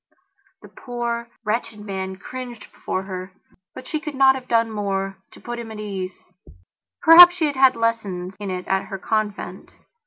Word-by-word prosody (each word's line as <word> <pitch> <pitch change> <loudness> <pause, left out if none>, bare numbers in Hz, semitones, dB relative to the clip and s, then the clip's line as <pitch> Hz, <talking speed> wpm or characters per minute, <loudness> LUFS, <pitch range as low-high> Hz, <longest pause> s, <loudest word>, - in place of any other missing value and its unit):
The - - -11
poor, 235 -1 -4 0.2
wretched 215 0 -2
man 190 -2 -5
cringed 245 +3 -9
before 190 - -4
herbut 185 +3 -10
she 310 - -2
could 300 -2 -6
not 265 0 +6
have 260 -1 -8
done 230 -1 +2
more 195 -2 -2
to - - -16
put 240 0 -6
him 230 -1 -7
at 220 - -8
his 210 - -6
ease. 190 -2 -6 0.8
Perhaps 350 +1 +10
she 340 -3 0
had 290 -2 -1
had 265 -1 +5
lessons 205 -6 -2
in 205 -1 -5
it 180 -1 -5
at 190 0 0
her 195 0 -6
convent. 215 +1 -3
215 Hz, 175 wpm, -22 LUFS, 195-245 Hz, 0.8 s, Perhaps